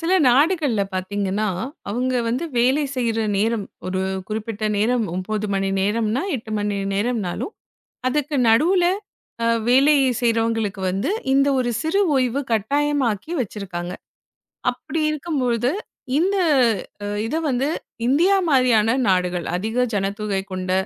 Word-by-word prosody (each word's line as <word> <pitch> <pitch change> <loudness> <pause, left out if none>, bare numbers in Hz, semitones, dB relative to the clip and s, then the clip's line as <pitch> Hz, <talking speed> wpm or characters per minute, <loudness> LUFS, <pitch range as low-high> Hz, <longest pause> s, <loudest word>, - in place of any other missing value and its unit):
சில 340 +2 0 0.2
நாடுகள்ல 285 - +3
பாத்தீங்கன்னா, 200 +2 -1 0.4
அவங்க 250 +5 -1
வந்து 255 +8 -1
வேலை 265 +5 +3
செய்ற 230 -2 0 0.2
நேரம், 220 0 0 0.2
ஒரு 185 0 -1 0.3
குறிப்பிட்ட 215 0 -4
நேரம் 235 +2 +2
9 215 +3 -2
மணி 195 0 0
நேரம்ன்னா, 220 +5 0
8 220 -1 -9
மணி 205 -1 -1 0.2
நேரம்னாலும் 215 - -2 0.6
அதுக்கு 295 +1 -1
நடுவுல 345 +10 +4 0.6
அ - - +2 0.2
வேலை 275 +4 +5 0.3
செய்றவங்களுக்கு 225 -4 0
வந்து, 195 - -1 0.2
இந்த 275 +1 +4
ஒரு 240 -1 0
சிறு 325 +6 +1 0.2
ஓய்வு 255 +1 +1
கட்டாயமாக்கி 275 - 0
வச்சிருக்காங்க. 185 -5 -5 0.8
அப்படி 325 - -4
இருக்கும்பொழுது 255 -7 0 0.5
இந்த 390 +4 +2 0.9
இத 230 - -2
வந்து 260 +2 0 0.4
இந்தியா 340 +9 +4
மாரியான 250 -5 +4
நாடுகள் 180 -2 +1
அதிக 220 +6 0
ஜனத்தொகை 200 0 -1
கொண்ட 185 0 -3
230 Hz, 115 wpm, -22 LUFS, 205-275 Hz, 0.9 s, வேலை